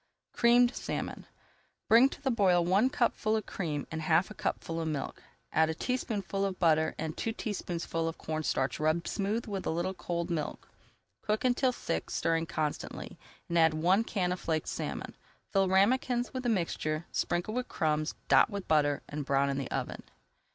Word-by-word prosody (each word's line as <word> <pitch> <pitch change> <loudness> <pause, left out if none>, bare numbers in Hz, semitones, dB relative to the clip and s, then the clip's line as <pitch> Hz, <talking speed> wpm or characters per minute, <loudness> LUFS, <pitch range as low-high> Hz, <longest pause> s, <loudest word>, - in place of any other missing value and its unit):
CREAMED 240 +1 +5
SALMON - - -4 0.6
Bring 240 +4 +7
to - - -10
the 270 -2 0
boil 185 -6 +3
one 195 +8 +4
cupful 235 -5 +1
of 215 - -1
cream 150 -6 -3
and 160 -1 -3
half 160 +5 +2
a - - -5
cupful 165 -4 -3
of 160 - -2
milk. 145 -4 -4 0.3
Add 160 0 +4
a 160 - -2
teaspoonful 205 -4 -2
of 195 -2 -1
butter 160 -2 +3
and 160 0 -3
two 225 - -2
teaspoonfuls 175 -6 -3
of 165 - -8
corn 155 0 -3
starch 130 -3 -1
rubbed 155 +2 +1
smooth 210 +3 -1
with 200 -3 -4
a - - +1
little 175 +4 -1
cold 175 -1 -3
milk. 155 -3 -3 0.5
Cook 215 +3 -1
until 255 +1 +3
thick, 80 - -3
stirring 165 0 0
constantly, 155 -2 -4 0.3
and 170 0 +1
add 160 -1 +5
one 180 +7 +3
can 185 -5 -1
of 180 - -2
flaked 160 -1 -1
salmon. - - -4 0.4
Fill 195 -2 +3
ramekins 240 +5 +2
with 255 - -2
the 245 - -1
mixture, 170 -5 -1
sprinkle 175 +5 -1
with 250 +1 -2
crumbs, 155 0 0
dot - - +6
with 200 -3 -5
butter, 145 -2 +2
and 145 0 -4
brown 140 0 +2
in 135 - -2
the 135 - -4
oven. - - -3
175 Hz, 180 wpm, -30 LUFS, 160-215 Hz, 0.6 s, Bring